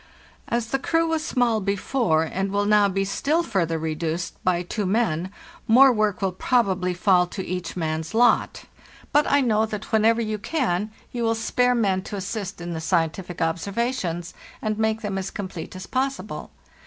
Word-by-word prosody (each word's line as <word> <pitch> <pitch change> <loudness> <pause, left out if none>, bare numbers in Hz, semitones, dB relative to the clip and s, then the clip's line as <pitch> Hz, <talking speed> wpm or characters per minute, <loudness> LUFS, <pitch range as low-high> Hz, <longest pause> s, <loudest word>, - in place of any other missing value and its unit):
" - - -30
As 235 -1 -1
the 270 - 0
crew 330 +4 +1
was 320 -1 0
small 245 -7 +1
before, 200 -3 +1
and 190 +4 -2
will 205 0 +1
now 205 -1 +4
be 195 +1 0
still 300 - 0
further 175 - 0
reduced 160 +2 -3
by 180 -1 +1
two 200 +3 -3
men, 185 -5 0 0.4
more 260 +4 +7
work 215 -3 0
will 190 - +1
probably 185 -3 +1
fall 180 -1 +3
to 190 +2 -6
each 180 0 -4
man's 160 +2 -2
lot; 240 +1 +3 0.5
but 295 +1 +3
I 285 0 +5
know 220 -3 +2
that, 210 -2 -6
whenever 225 +1 +4
you 215 -2 -2
can, 215 - -1 0.2
you 240 - -4
will 225 -1 +2
spare 245 +2 +1
men 195 -5 +1
to 210 - -5
assist 200 0 -4
in 175 0 -5
the 160 - -4
scientific 170 +1 -1
ob 165 +2 0
Il.—7 - - -7
98 200 - -6 0.2
FARTHEST 255 - -4
NORTSIT 170 -2 -1
servations, 170 - -11 0.3
and 215 -1 -2
make 220 0 +1
them 200 -3 -2
as 190 - -4
complete 185 -5 -6
as_ 185 - -9
possible. 270 +1 -2
200 Hz, 195 wpm, -24 LUFS, 180-230 Hz, 0.5 s, more